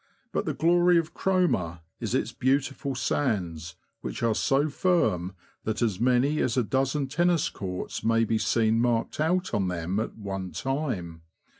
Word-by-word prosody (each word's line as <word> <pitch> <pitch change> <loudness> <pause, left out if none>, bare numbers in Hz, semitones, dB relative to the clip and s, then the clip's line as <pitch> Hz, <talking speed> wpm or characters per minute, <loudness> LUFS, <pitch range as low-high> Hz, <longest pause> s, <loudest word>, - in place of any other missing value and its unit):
But - - -1
the - - -2
glory 175 +1 +4
of 165 0 -1
Cromer 130 - +1 0.2
is - - -2
its - - 0
beautiful 135 +1 0
sands, 90 - -1 0.2
which - - -5
are 115 -1 +3
so 140 +6 +2
firm 110 - +1 0.3
that 110 +2 -1
as 105 -5 0
many 125 +5 +2
as 125 0 0
a 125 - +4
dozen 135 +4 0
tennis 170 +3 +2
courts 90 -2 -5
may 115 +1 +3
be 110 0 +1
seen 115 0 +2
marked 120 +1 0
out 180 +4 +1
on 95 -2 +1
them 90 +2 -2
at 110 - -4
one 95 -3 -5
time. 125 - -3
120 Hz, 160 wpm, -27 LUFS, 95-150 Hz, 0.3 s, glory